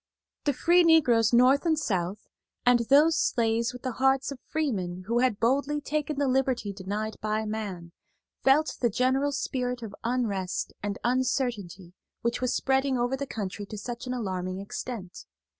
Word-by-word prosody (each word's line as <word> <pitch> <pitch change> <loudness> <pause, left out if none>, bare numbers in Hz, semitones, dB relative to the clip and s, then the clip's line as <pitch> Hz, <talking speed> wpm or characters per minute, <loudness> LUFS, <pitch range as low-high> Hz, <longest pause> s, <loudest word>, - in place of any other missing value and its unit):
The 290 - +2
free 345 +6 +4
negroes 250 -10 +4
North 255 +4 +5
and 325 -2 +2
South, 190 - -2 0.4
and 245 -1 +5
those 300 +4 +6
slaves 230 0 +1
with 250 -1 -11
the 255 - -2
hearts 270 +1 +3
of 275 - -7
freemen 190 - -2
who 235 +3 +1
had 245 -5 +1
boldly 280 +5 +1
taken 300 0 -2
the 285 -1 +1
liberty 255 -5 0
denied 205 +3 -4
by 215 0 -1
man, 200 -6 -5 0.5
felt 290 +4 +3
the 240 - +3
general 260 +5 +1
spirit 250 -3 -2
of 210 -3 -7
unrest 220 -7 -1
and 205 -1 -3
uncertainty 235 - -1 0.3
which 235 +1 -1
was 255 -1 +1
spreading 265 0 +1
over 245 +2 0
the 280 +1 -5
country 205 -3 -5
to 215 - -7
such 240 +4 -6
an 250 - -2
alarming 185 -5 -3
extent. 200 -1 -7
245 Hz, 160 wpm, -27 LUFS, 205-270 Hz, 0.5 s, those